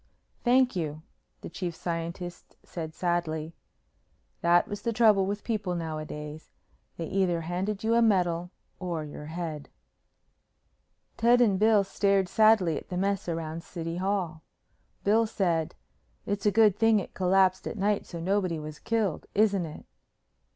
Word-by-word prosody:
"Thank 250 -1 +4
you," 155 -3 -3 0.4
the - - -7
Chief 175 -3 -4
Scientist 170 +1 -5
said 160 -2 -7
sadly. 165 -3 -1 0.9
That 175 0 +4
was 205 0 -5
the 235 - -1
trouble 215 -4 +4
with 205 +1 -3
people 205 -6 -2
nowadays. 155 -2 -6 0.5
They 165 - -3
either 180 -1 0
handed 185 +5 -3
you 225 +1 +2
a 235 - +4
medal 180 -5 +2 0.3
or 175 -4 -3
your 150 0 -9
head. 160 -3 -5 1.5
Ted 240 +2 +5
and 205 -6 +3
Bill 215 -1 +5
stared 195 -1 +1
sadly 215 -6 +4
at - - -9
the 180 - -3
mess 195 -1 -1
around 165 0 -3
the - - -21
City 165 -1 -5
Hall. 185 -4 -1 0.6
Bill 220 +3 +3
said, 170 -7 0 0.5
"It's 205 +1 -1
a - - +5
good 215 -2 +5
thing 225 0 +4
it 190 - -7
collapsed 185 0 +2
at - - -5
night 205 +1 0
so 170 - -7
nobody 185 -1 0
was 150 -1 -7
killed, 220 -8 -1
isn't 200 -4 +3
it?" 155 - -10
185 Hz, 150 wpm, -28 LUFS, 165-205 Hz, 1.5 s, Ted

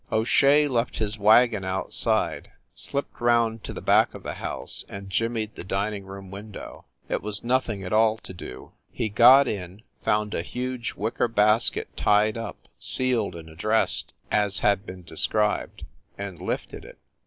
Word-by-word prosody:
O 110 - +2
Shea 145 +5 +4
left 120 -3 -1
his 110 0 -2
wagon 110 0 +5
outside, 95 0 -1 0.2
slipped 140 -3 -5
round 115 -2 +2
to - - -5
the - - -7
back - - +4
of - - -10
the - - -4
house - - -5
and 100 -1 -8
jimmied 115 0 -1
the - - -8
din 100 +3 -1
ing 100 -2 -7
room 95 -1 -9
window. 100 +1 -9 0.2
It - - -2
was 105 -1 -2
nothing 120 -5 0
at 95 - -4
all 110 0 +4
to 110 - -9
do. 85 -7 -10 0.2
He 110 - -2
got 125 +6 +7
in, 95 0 -5 0.2
found 105 0 +1
a - - -1
huge 125 +4 -4
wicker 110 +3 -1
basket 110 0 +2
tied 105 +1 +3
up, 115 0 -7
sealed 125 -7 +2
and 80 -1 -9
addressed, 105 +8 0 0.2
as 105 -2 +1
had 100 0 +2
been 90 -1 -9
described, 105 +5 -1 0.3
and 100 -4 -7
lifted - - -4
it. - - -13
105 Hz, 165 wpm, -25 LUFS, 100-115 Hz, 0.3 s, got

